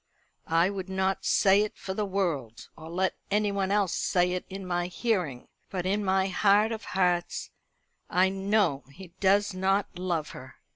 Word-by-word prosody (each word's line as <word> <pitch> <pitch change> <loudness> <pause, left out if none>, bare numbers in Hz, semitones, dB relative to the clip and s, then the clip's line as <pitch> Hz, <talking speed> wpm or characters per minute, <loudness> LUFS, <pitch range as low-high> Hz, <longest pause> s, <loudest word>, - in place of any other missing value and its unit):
I 165 +4 +3
would 190 -1 -6
not 190 0 -1
say 195 +1 +4
it 210 - -3
for 190 - -5
the 210 +1 -2
world, 160 - -2
or 160 0 -10
let 185 +2 0 0.2
anyone 200 -2 0
else 200 -3 +1
say 180 -1 +1
it 180 0 -3
in 195 0 -7
my 175 -1 -1
hearing, 180 - -2 0.2
but, 185 -2 -3
in 205 +3 0
my 190 0 +2
heart 205 +3 +3
of 220 -1 -4
hearts, 180 -2 -1 0.6
I 185 +1 +3
know 195 -6 +1
he 185 +5 -12
does 200 +1 +3
not 190 0 0
love 170 -4 -2
her." - - -11
190 Hz, 165 wpm, -28 LUFS, 180-200 Hz, 0.6 s, say